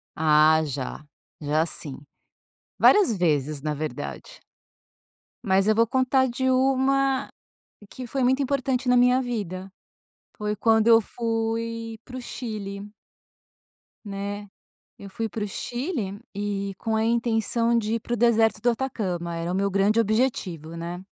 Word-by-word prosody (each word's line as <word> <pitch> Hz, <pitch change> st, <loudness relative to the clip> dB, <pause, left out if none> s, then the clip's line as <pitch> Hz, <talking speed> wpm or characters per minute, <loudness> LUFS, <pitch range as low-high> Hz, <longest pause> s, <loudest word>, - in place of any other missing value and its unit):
Ah, 155 Hz, 0 st, +5 dB
já. 140 Hz, 0 st, -5 dB, 0.4 s
Já 150 Hz, +2 st, +1 dB
sim. 145 Hz, -4 st, -5 dB, 0.8 s
Várias 385 Hz, -, +5 dB
vezes, 150 Hz, -4 st, 0 dB
na 150 Hz, 0 st, -2 dB
verdade. 125 Hz, -, -6 dB, 1.1 s
Mas 195 Hz, +1 st, +3 dB
eu 215 Hz, -, +4 dB
vou 230 Hz, -, +4 dB
contar 260 Hz, +2 st, +2 dB
de 260 Hz, +2 st, -1 dB
uma 270 Hz, +1 st, +2 dB, 0.6 s
que 255 Hz, +3 st, -8 dB
foi 265 Hz, +3 st, -2 dB
muito 260 Hz, +3 st, +3 dB
importante 265 Hz, -2 st, -1 dB
na 250 Hz, -, +5 dB
minha 250 Hz, +1 st, +4 dB
vida. 195 Hz, -6 st, -5 dB, 0.7 s
Foi 210 Hz, 0 st, -2 dB
quando 220 Hz, +1 st, +3 dB
eu 230 Hz, -1 st, +8 dB
fui 225 Hz, 0 st, -3 dB
para 255 Hz, -, -9 dB
o 255 Hz, -, -6 dB
Chile. 205 Hz, -4 st, -6 dB, 1.1 s
Né. 200 Hz, 0 st, -5 dB, 0.5 s
Eu 200 Hz, -, -10 dB
fui 225 Hz, +4 st, -3 dB
para 215 Hz, 0 st, -4 dB
o 205 Hz, -, -2 dB
Chile 240 Hz, -, -4 dB, 0.2 s
e 200 Hz, -1 st, -3 dB
com 220 Hz, +2 st, -2 dB
a 220 Hz, -, +1 dB
intenção 230 Hz, 0 st, +1 dB
de 220 Hz, 0 st, 0 dB
ir -, -, -1 dB
para 240 Hz, -, -5 dB
o -, -, +2 dB
deserto 225 Hz, -2 st, +3 dB
do 245 Hz, -, +3 dB
Atacama. 195 Hz, -9 st, -2 dB
Era 165 Hz, +1 st, -3 dB
o -, -, -1 dB
meu 200 Hz, +1 st, +1 dB
grande 200 Hz, +3 st, +2 dB
objetivo, 205 Hz, -, -1 dB
né. 175 Hz, +2 st, -6 dB
220 Hz, 145 wpm, -25 LUFS, 190-245 Hz, 1.1 s, eu